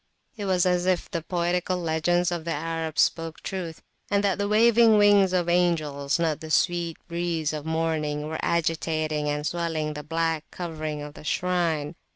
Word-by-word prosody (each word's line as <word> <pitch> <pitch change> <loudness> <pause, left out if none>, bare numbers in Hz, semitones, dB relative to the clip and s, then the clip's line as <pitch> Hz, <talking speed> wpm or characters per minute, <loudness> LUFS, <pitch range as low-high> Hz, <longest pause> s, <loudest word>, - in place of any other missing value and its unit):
It 210 -3 -5
was 185 -2 +2
as 180 0 +1
if 185 -2 0
the 170 - -2
poetical 175 +2 -1
legends 175 +1 +1
of 170 -2 -3
the 165 0 -2
Arab 165 0 -3
spoke 165 -1 +1
truth, 175 -4 -5 0.3
and 200 0 +2
that 200 -1 +1
the 200 - 0
waving 225 +1 +5
wings 205 -2 +5
of 180 -2 +1
angels, 155 -5 +1
not 165 -3 0
the 160 - -8
sweet 170 0 +1
breeze 170 -3 -1
of 155 0 -5
morning, 155 -2 -1
were 160 0 -4
agitating 155 -2 0
and 150 0 -2
swelling 160 -2 -2
the 150 - -6
black 165 +1 -1
covering 155 -4 -5
of 145 0 -8
the - - -12
shrine. 165 -2 0
165 Hz, 175 wpm, -26 LUFS, 155-180 Hz, 0.3 s, waving